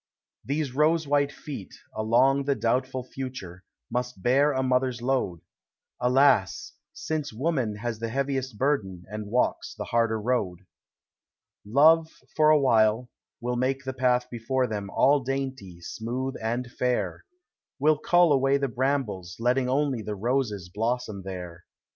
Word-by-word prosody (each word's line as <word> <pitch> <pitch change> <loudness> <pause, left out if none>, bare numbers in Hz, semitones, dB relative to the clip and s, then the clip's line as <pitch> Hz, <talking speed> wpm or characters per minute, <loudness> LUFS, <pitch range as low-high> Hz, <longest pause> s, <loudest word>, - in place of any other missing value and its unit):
These 140 -1 -2
rose 155 +2 +2
white 140 0 +2
feet, 140 -9 -8 0.2
along 125 +6 +2
the 140 -1 +1
doubtful 130 +2 -1
future, 125 -9 -7 0.3
Must 125 -5 -3
bear 140 +4 +4
a 130 -1 0
mother's 130 -1 +1
load; 120 -9 -1 0.6
Alas! 125 -5 +3 0.2
since 155 -2 -3
Woman 130 -3 -1
has 115 +1 -4
the 115 0 -3
heaviest 135 -2 -2
burden, 100 -11 -1
And 105 -1 -5
walks 125 +4 0
the - - -5
harder 115 -1 +1
road. 105 -6 -1 1.0
Love, 160 +8 +5 0.3
for 155 -1 +5
a 155 -1 +6
while, 115 -2 +3 0.3
will 125 +1 -2
make 130 +2 0
the 130 0 -4
path 125 -1 +1
before 125 +2 0
them 105 -4 -4
All 140 +7 +4
dainty, 130 -9 -4
smooth, 125 +8 -4
and 120 +2 -2
fair, 100 -10 -1 0.3
— - - -67
Will 150 +1 +3
cull 175 -1 +4
away 135 0 +3
the 140 -1 -1
brambles, 120 -9 -2
letting 125 +2 +1
only 135 -3 +1
The 105 -1 -4
roses 110 -4 -1
blossom 115 -2 -2
there. 90 -3 -8
125 Hz, 140 wpm, -26 LUFS, 110-135 Hz, 1.0 s, a